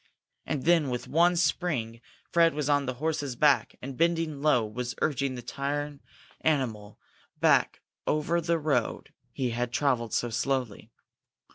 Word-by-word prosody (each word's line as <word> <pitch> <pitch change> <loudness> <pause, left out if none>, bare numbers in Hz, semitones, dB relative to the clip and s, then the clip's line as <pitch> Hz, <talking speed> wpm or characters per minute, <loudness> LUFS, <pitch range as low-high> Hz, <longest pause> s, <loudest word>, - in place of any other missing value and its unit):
And 135 - -2
then, 165 -4 +4
with 125 -1 -4
one 175 +3 +3
spring, 130 -10 -1 0.3
Fred 165 -2 +4
was 150 -2 -1
on 145 -2 +2
the 130 - -2
horse's 145 -2 -2
back, 145 +2 +3
and, 135 0 -6
bending 165 -2 0
low, 135 -7 +3
was 120 +3 -5
urging 140 -3 0
the 120 - -7
tired 145 +2 -3 0.4
animal 115 -9 -1 0.4
back - - +3 0.3
over 155 +3 +1
the 170 0 +1
road 145 -7 -1 0.2
he 125 -2 -2
had 120 +1 -2
travelled 120 -4 0
so 120 - -1
slowly. 125 -1 -2
140 Hz, 145 wpm, -28 LUFS, 125-155 Hz, 0.4 s, then